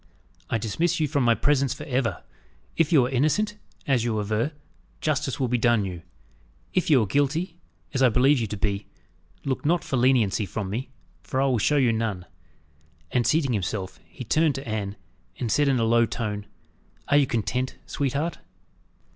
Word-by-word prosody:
"I -, -, +1 dB
dismiss 115 Hz, +12 st, 0 dB
you 155 Hz, -, +2 dB
from 140 Hz, -2 st, +1 dB
my 120 Hz, -1 st, +4 dB
presence 140 Hz, +4 st, +1 dB
for -, -, -8 dB
ever. 130 Hz, -5 st, -1 dB, 0.5 s
If 165 Hz, -1 st, +2 dB
you 140 Hz, -7 st, +5 dB
are -, -, -2 dB
innocent, 180 Hz, -, +1 dB, 0.3 s
as 130 Hz, -5 st, +2 dB
you 115 Hz, -3 st, 0 dB
aver, 110 Hz, +7 st, 0 dB, 0.5 s
justice 150 Hz, -3 st, -1 dB
will 130 Hz, -, +1 dB
be 120 Hz, 0 st, 0 dB
done 115 Hz, -3 st, +3 dB
you.. 90 Hz, -3 st, -6 dB, 0.7 s
If 185 Hz, -, +1 dB
you 135 Hz, -7 st, +5 dB
are -, -, 0 dB
guilty, 155 Hz, -, 0 dB, 0.3 s
as 135 Hz, -, 0 dB
I 130 Hz, -, +6 dB
believe 130 Hz, +4 st, +4 dB
you 115 Hz, -, -1 dB
to 105 Hz, -, -5 dB
be, 100 Hz, 0 st, -2 dB, 0.6 s
look 135 Hz, -2 st, -1 dB
not 170 Hz, +3 st, +2 dB
for 135 Hz, -, -2 dB
leniency 120 Hz, -5 st, +3 dB
from 95 Hz, +1 st, -4 dB
me, 125 Hz, +6 st, -3 dB, 0.3 s
for 130 Hz, -, -3 dB
I 135 Hz, -, +3 dB
will 130 Hz, -4 st, +2 dB
show 150 Hz, +8 st, +2 dB
you 125 Hz, -4 st, +3 dB
none." 110 Hz, -5 st, -2 dB, 0.9 s
And, 125 Hz, -2 st, +1 dB
seating 150 Hz, -5 st, +2 dB
himself, 95 Hz, -1 st, -3 dB
he 130 Hz, -, -9 dB
turned 155 Hz, +4 st, +2 dB
to 135 Hz, +1 st, -6 dB
Anne, 105 Hz, -2 st, -3 dB, 0.4 s
and 115 Hz, -3 st, -2 dB
said, 145 Hz, -1 st, +3 dB
in 135 Hz, -2 st, +3 dB
a 115 Hz, -, +1 dB
low 115 Hz, +1 st, +4 dB
tone, 105 Hz, -3 st, -4 dB, 0.6 s
"Are 145 Hz, -, +4 dB
you 140 Hz, -2 st, +4 dB
content, 125 Hz, +3 st, -1 dB
sweetheart?" 145 Hz, +4 st, -2 dB
125 Hz, 185 wpm, -25 LUFS, 110-145 Hz, 0.9 s, I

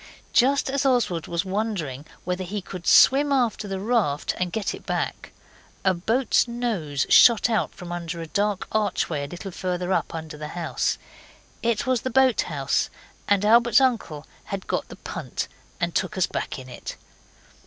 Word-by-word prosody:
Just 275 Hz, +3 st, +4 dB
as 275 Hz, 0 st, 0 dB
Oswald 240 Hz, -, +1 dB
was 170 Hz, +2 st, -1 dB
wondering 185 Hz, -, -3 dB, 0.2 s
whether 180 Hz, +1 st, -2 dB
he 200 Hz, +3 st, -4 dB
could 185 Hz, -2 st, -8 dB
swim 285 Hz, +2 st, +6 dB
after 240 Hz, -6 st, +1 dB
the 195 Hz, -1 st, -3 dB
raft 205 Hz, -9 st, 0 dB
and 180 Hz, -1 st, -1 dB
get 215 Hz, +1 st, -2 dB
it -, -, -9 dB
back, -, -, -3 dB, 0.5 s
a 190 Hz, -, +5 dB
boat's 225 Hz, +9 st, +2 dB
nose 215 Hz, -, -1 dB
shot 235 Hz, 0 st, +6 dB
out 220 Hz, -, 0 dB
from 180 Hz, -2 st, -8 dB
under 170 Hz, -1 st, -4 dB
a 165 Hz, -, -4 dB
dark 205 Hz, +3 st, -1 dB
archway 185 Hz, -8 st, 0 dB
a -, -, -7 dB
little 180 Hz, +5 st, -7 dB
further 180 Hz, 0 st, -2 dB
up -, -, -1 dB
under 160 Hz, -1 st, -6 dB
the 150 Hz, 0 st, -6 dB
house. 170 Hz, -2 st, -1 dB, 0.6 s
It 235 Hz, +3 st, 0 dB
was 255 Hz, -3 st, +1 dB
the 260 Hz, -, -2 dB
boathouse, 260 Hz, -1 st, +2 dB, 0.4 s
and 205 Hz, 0 st, +3 dB
Albert's 235 Hz, +2 st, +6 dB
uncle 225 Hz, -, 0 dB, 0.2 s
had 195 Hz, -1 st, -5 dB
got -, -, -2 dB
the -, -, -10 dB
punt -, -, -5 dB, 0.3 s
and 170 Hz, -1 st, -1 dB
took 210 Hz, -, -1 dB
us 185 Hz, -, +3 dB
back -, -, -4 dB
in 130 Hz, -1 st, -9 dB
it. 125 Hz, -, -8 dB
195 Hz, 170 wpm, -24 LUFS, 170-235 Hz, 0.6 s, swim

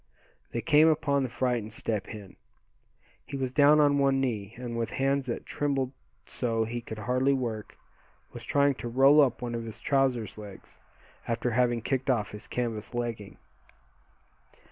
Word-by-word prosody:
They 120 Hz, -, -2 dB
came 155 Hz, +2 st, +5 dB
upon 145 Hz, -3 st, +2 dB
the 130 Hz, -, -1 dB
frightened 120 Hz, -3 st, -1 dB
Step 105 Hz, -3 st, -3 dB
Hen. 105 Hz, -4 st, -10 dB, 0.9 s
He 140 Hz, -, -6 dB
was 130 Hz, -2 st, -2 dB
down 145 Hz, +3 st, +5 dB
on 145 Hz, -1 st, +4 dB
one 135 Hz, -1 st, +3 dB
knee, 110 Hz, -5 st, -2 dB
and 120 Hz, -1 st, -5 dB
with 115 Hz, -1 st, -2 dB
hands 135 Hz, 0 st, 0 dB
that 120 Hz, -, -4 dB
trembled 135 Hz, -3 st, -1 dB, 0.3 s
so 115 Hz, -2 st, -1 dB
he 120 Hz, +2 st, -4 dB
could 110 Hz, -1 st, -8 dB
hardly 130 Hz, +5 st, +1 dB
work, 115 Hz, -5 st, -4 dB, 0.6 s
was -, -, -8 dB
trying 140 Hz, 0 st, +3 dB
to 120 Hz, -, -4 dB
roll 135 Hz, +5 st, +6 dB
up 130 Hz, -3 st, +1 dB
one 120 Hz, -1 st, -3 dB
of 115 Hz, 0 st, -3 dB
his 110 Hz, 0 st, -8 dB
trousers' 130 Hz, -7 st, 0 dB
legs, 100 Hz, -3 st, -12 dB, 0.5 s
after 120 Hz, +1 st, -1 dB
having 120 Hz, -1 st, +1 dB
kicked 135 Hz, +1 st, -1 dB
off 115 Hz, -5 st, +1 dB
his 105 Hz, -, -10 dB
canvas 115 Hz, -2 st, -3 dB
legging. 115 Hz, -4 st, -4 dB
125 Hz, 165 wpm, -28 LUFS, 115-135 Hz, 0.9 s, roll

